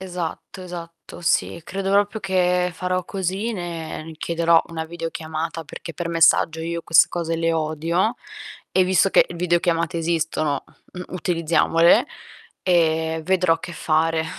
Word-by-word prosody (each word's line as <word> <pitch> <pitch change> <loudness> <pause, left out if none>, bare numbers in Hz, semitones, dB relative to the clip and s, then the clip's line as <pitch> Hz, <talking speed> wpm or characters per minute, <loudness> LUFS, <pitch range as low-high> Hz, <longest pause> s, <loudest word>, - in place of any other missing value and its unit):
Esatto, 180 0 -6
esatto, 170 -1 -9
sì. 170 0 0
Credo 195 +1 +1
proprio 205 +2 -4
che 180 -1 +1
farò 185 +1 -2
così, 195 +5 -2
ne 165 -4 -6
chiederò 170 0 +3
una 160 -1 -4
videochiamata 165 -1 -5
perché 165 +2 -9
per 170 +3 -4
messaggio 165 -1 +3
io 170 +1 -3
queste 165 - +5
cose 165 -1 -2
le 165 0 +1
odio 165 +7 0 0.6
e 185 - +4
visto 185 +1 +3
che - - +6
videochiamate 170 -1 0
esistono, 160 -3 -1 0.3
mh, 180 - -6
utilizziamole, 170 -1 +3 0.6
e 160 -2 +2
vedrò 180 -2 +2
che 175 - -7
fare. 160 0 +1
170 Hz, 130 wpm, -22 LUFS, 165-180 Hz, 0.6 s, che